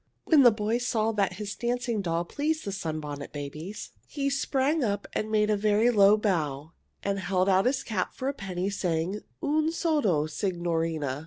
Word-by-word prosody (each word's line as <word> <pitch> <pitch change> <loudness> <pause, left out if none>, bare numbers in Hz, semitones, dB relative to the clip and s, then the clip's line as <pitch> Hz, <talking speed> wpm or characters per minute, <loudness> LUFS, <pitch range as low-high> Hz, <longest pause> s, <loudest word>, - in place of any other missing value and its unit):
When 310 -4 +6
the 245 - +9
boy 215 +1 -1
saw 225 -3 0
that 200 -4 0
his 200 +2 -5
dancing 240 -2 -1
doll 170 -2 -1
pleased 310 - -2
the 200 - -3
Sunbonnet 155 -6 -5
Babies, 155 +8 -7 0.2
he 280 -1 -2
sprang 275 +2 +1
up 205 -3 -1
and 215 - -2
made 215 0 +2
a - - +3
very 215 +3 +3
low 205 -1 +6
bow 160 -8 -1 0.3
and 200 0 -1
held 185 0 0
out 190 +1 +4
his 260 0 0
cap 200 -5 -2
for 260 - -4
a 280 - 0
penny, 190 -4 -3
saying, 180 0 -1 0.2
"Un 310 +1 +1
soldo, 290 - +1
signorine!" 165 -2 -1
205 Hz, 175 wpm, -27 LUFS, 175-240 Hz, 0.3 s, the